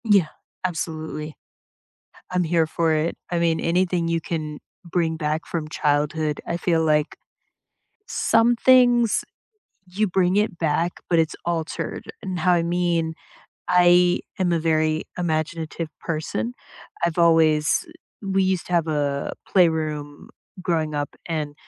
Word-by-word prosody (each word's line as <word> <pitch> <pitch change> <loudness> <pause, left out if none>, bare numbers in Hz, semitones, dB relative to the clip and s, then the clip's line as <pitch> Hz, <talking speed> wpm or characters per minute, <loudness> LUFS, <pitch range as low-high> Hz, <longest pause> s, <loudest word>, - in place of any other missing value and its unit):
Yeah. 200 -7 +4 0.4
Absolutely. 155 -3 -4 1.0
I'm 180 0 +2
here 165 -1 +2
for 160 +1 0
it. 155 +2 0
I 175 - 0
mean, 165 -1 +1
anything 175 0 +1
you 165 0 0
can 155 -2 -4 0.3
bring 170 -2 -1
back 155 0 -2
from 160 -3 -3
childhood, 150 0 0
I 170 - -2
feel 170 -2 +1
like 150 -1 +1 0.9
some 235 +1 +3
things 245 -2 +4 0.6
you 190 +4 0
bring 185 0 +1
it 210 -4 +1
back, 165 +2 +1 0.2
but 170 - +3
it's 160 -1 +1
altered, 165 -2 -3 0.2
and 185 -2 -4
how 180 +2 +3
I 175 -1 +3
mean, 170 -1 0 0.5
I 180 0 +5 0.2
am 180 -2 +1
a 170 - +2
very 155 -1 +1
imaginative 160 -1 -2
person. 165 +9 -3 0.5
I've 170 0 -1
always 160 - +4 0.4
we 195 -1 +1
used 185 -2 0
to - - -7
have 170 -2 +2
a 145 -2 -1
playroom 155 -5 0 0.3
growing 160 -4 -1
up, 145 0 -2 0.2
and 155 -3 -3
165 Hz, 135 wpm, -23 LUFS, 155-180 Hz, 1.0 s, I